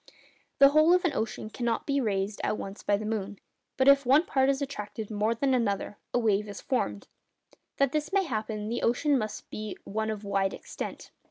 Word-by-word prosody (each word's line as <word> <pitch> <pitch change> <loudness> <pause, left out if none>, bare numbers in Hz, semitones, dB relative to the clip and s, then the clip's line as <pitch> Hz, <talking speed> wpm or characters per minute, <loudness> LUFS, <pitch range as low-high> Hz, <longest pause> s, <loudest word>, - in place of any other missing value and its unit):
The 275 - +8
whole 310 +4 +5
of 365 - +1
an 330 - +1
ocean 220 -1 -3
cannot 235 -1 -1
be 280 -1 +1
raised 200 -2 -1
at 215 - 0
once 195 +1 -7
by 205 - +1
the 215 - -5
moon; 210 -2 -3 0.4
but 260 - +3
if 280 0 +7
one 275 +6 +4
part 265 0 +2
is 275 -1 +1
attracted 220 -6 -5
more 215 +2 +1
than 265 +3 +1
another, 205 -4 -1
a - - +1
wave 210 -3 +1
is 200 - -7
formed. 105 - -2 0.7
That 275 -2 +3
this 305 +1 -2
may 395 0 +3
happen, 215 - -3
the 235 +2 -2
ocean 280 +5 +2
must 215 -4 -3
be 215 -1 -5
one 220 +2 -2
of 215 -1 -4
wide 195 -1 0
extent. - - -7
225 Hz, 200 wpm, -28 LUFS, 210-275 Hz, 0.7 s, The